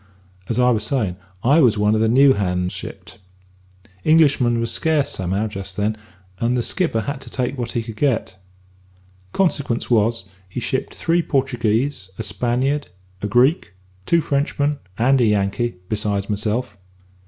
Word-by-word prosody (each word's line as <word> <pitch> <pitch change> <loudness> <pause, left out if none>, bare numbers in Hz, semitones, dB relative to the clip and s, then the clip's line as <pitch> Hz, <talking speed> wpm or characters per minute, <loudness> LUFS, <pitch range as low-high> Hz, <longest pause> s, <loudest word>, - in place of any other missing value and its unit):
As 115 - -1
I 125 0 +4
was 110 -3 0
savin', 110 -7 -1 0.3
I 140 +6 +5
was 120 -8 +4
one 105 +1 +3
of 110 - +2
the 110 - +3
new 135 +3 +6
hands 90 -3 -1
shipped. - - -9 0.8
Englishmen 140 -7 +4
was 115 0 -1
scarce 155 -1 +1
somehow 95 +3 -1
just 100 -3 -6
then, 105 +1 0 0.4
and 120 +1 +1
the 120 - 0
skipper 165 -10 0
had 140 +4 -4
to - - -10
take 130 +1 -2
what 120 -3 -4
he 120 - -1
could 110 -2 -9
get. 120 -8 0 1.0
Consequence 145 - 0
was, 115 -1 +2 0.3
he - - -4
shipped - - -2
three 170 +1 +1
Portuguese, 125 - 0
a - - -3
Spaniard, 125 +6 -1 0.3
a 105 - -1
Greek, 125 - +2 0.3
two 170 -1 +4
Frenchmen, 145 0 0 0.2
and 130 +3 +3
a - - +4
Yankee, 105 +2 0
besides 105 -1 -1
myself. 105 +3 -2
120 Hz, 155 wpm, -21 LUFS, 105-135 Hz, 1.0 s, new